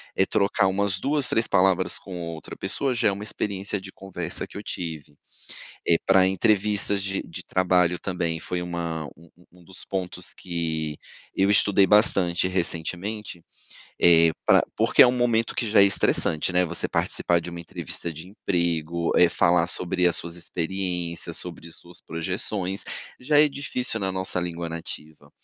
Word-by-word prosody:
é 95 Hz, -, +3 dB
trocar 100 Hz, -1 st, +1 dB
umas 95 Hz, -1 st, 0 dB
2, 140 Hz, +2 st, +1 dB
3 115 Hz, -2 st, +2 dB
palavras 95 Hz, -1 st, +2 dB
com 95 Hz, -, -9 dB
outra 80 Hz, -2 st, -8 dB
pessoa 130 Hz, +7 st, 0 dB
já 120 Hz, -2 st, +1 dB
é -, -, +1 dB
uma 100 Hz, +1 st, -6 dB
experiência 100 Hz, -1 st, -2 dB
de 95 Hz, 0 st, -9 dB
conversa 95 Hz, -1 st, -5 dB
que -, -, -10 dB
eu -, -, -7 dB
tive. 80 Hz, -4 st, -6 dB, 0.7 s
Eh, 85 Hz, -, +5 dB
pra 95 Hz, -1 st, +5 dB
entrevistas 100 Hz, 0 st, +2 dB
de 95 Hz, 0 st, -2 dB
de -, -, -9 dB
trabalho 90 Hz, -1 st, +2 dB
também 85 Hz, -4 st, -3 dB
foi 90 Hz, -1 st, -4 dB
uma 85 Hz, -3 st, -4 dB
um 80 Hz, 0 st, -19 dB
um 90 Hz, -, -22 dB, 0.2 s
um -, -, -19 dB
dos 95 Hz, +1 st, -12 dB
pontos 95 Hz, -2 st, -5 dB
que 80 Hz, -3 st, -4 dB, 0.4 s
eu 95 Hz, +1 st, +3 dB
estudei 100 Hz, -1 st, +4 dB
bastante 95 Hz, -4 st, +4 dB
recentemente, 90 Hz, +2 st, -3 dB, 0.6 s
eh, 85 Hz, -1 st, +6 dB
pra -, -, +5 dB
porque -, -, +5 dB
é -, -, +8 dB
um 125 Hz, -, +2 dB
momento 115 Hz, -2 st, +1 dB
que 120 Hz, -, -1 dB
já 110 Hz, -1 st, +4 dB
é -, -, +8 dB
estressante, 90 Hz, -3 st, +1 dB
né, 90 Hz, 0 st, +3 dB
você 85 Hz, -, -2 dB
participar 85 Hz, -1 st, +2 dB
de 85 Hz, -, -7 dB
uma 85 Hz, 0 st, -7 dB
entrevista 85 Hz, 0 st, -4 dB
de 80 Hz, +4 st, -10 dB
emprego, 85 Hz, -4 st, -1 dB
eh, 90 Hz, -, +6 dB
falar 85 Hz, 0 st, +2 dB
sobre 90 Hz, +1 st, +1 dB
as 85 Hz, -, +3 dB
suas 85 Hz, 0 st, -3 dB
experiências, 85 Hz, -1 st, -3 dB
sobre 85 Hz, -1 st, -6 dB
suas 85 Hz, +2 st, -13 dB
projeções, 95 Hz, +3 st, -3 dB, 0.4 s
já 145 Hz, +4 st, +2 dB
é 150 Hz, -, +5 dB
difícil 130 Hz, -5 st, -3 dB
na 95 Hz, -1 st, -1 dB
nossa 95 Hz, -1 st, 0 dB
língua 85 Hz, -1 st, -4 dB
nativa. 80 Hz, -3 st, -8 dB
90 Hz, 165 wpm, -24 LUFS, 85-100 Hz, 0.7 s, é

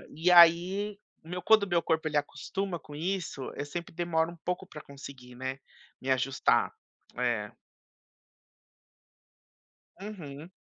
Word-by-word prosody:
e 165 Hz, +3 st, +2 dB
aí, 180 Hz, +5 st, +6 dB, 0.2 s
o 165 Hz, -, -14 dB
meu 180 Hz, 0 st, -4 dB
co 220 Hz, -, +7 dB
quando 215 Hz, -, -2 dB
o 200 Hz, -, -1 dB
meu 175 Hz, -2 st, +2 dB
corpo 160 Hz, -1 st, 0 dB
ele 150 Hz, -1 st, 0 dB
acostuma 175 Hz, +5 st, -3 dB
com 145 Hz, -, -12 dB
isso, 170 Hz, -5 st, -3 dB
eu 145 Hz, -, -3 dB
sempre 170 Hz, +3 st, -6 dB
demoro 170 Hz, -1 st, 0 dB
um 170 Hz, -, -12 dB
pouco 180 Hz, 0 st, -2 dB
pra 150 Hz, -, -9 dB
conseguir, 135 Hz, -3 st, -11 dB
né. 130 Hz, +2 st, -4 dB, 0.4 s
Me 135 Hz, -, -4 dB
ajustar, 130 Hz, +1 st, +2 dB, 0.4 s
é. 120 Hz, -4 st, 0 dB, 2.5 s
Uhum. 170 Hz, -6 st, -8 dB
160 Hz, 140 wpm, -30 LUFS, 140-180 Hz, 2.5 s, co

